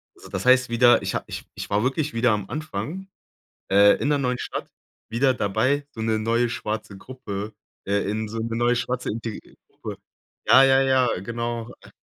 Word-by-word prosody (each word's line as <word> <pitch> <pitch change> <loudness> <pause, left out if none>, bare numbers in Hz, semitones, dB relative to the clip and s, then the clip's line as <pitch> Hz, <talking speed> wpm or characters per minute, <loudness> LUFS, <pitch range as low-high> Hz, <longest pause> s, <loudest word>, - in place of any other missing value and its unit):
Also, - - -14
das - - -4
heißt 130 -1 +5
wieder, 120 +1 +5
ich - - -3
ha - - -2
ich - - -7
ich - - -6
war 105 +1 +1
wirklich 140 +3 -1
wieder 115 +1 +2
am 105 -2 -2
Anfang, 155 - -5 0.6
äh, 100 +1 +6
in 145 - +1
der 145 - +3
neuen 125 -2 -1
Stadt - - -5 0.4
wieder 130 +4 +2
dabei, 130 +7 0
so 115 - -7
'ne 110 0 +1
neue 115 +2 +1
schwarze 105 -3 -4
Gruppe 105 -3 -7 0.3
äh, 100 0 0
in 110 +1 -2
so 115 +2 -5
'ne 115 0 -3
neue 120 +1 +2
schwarze 125 +1 -2
inte 115 0 -4 0.4
kur - - -6 0.5
ja, 135 - +7
ja, 135 0 +5
ja, 130 -5 +2
genau, 115 +2 -4
äh. - - -15
120 Hz, 190 wpm, -24 LUFS, 110-130 Hz, 0.6 s, ja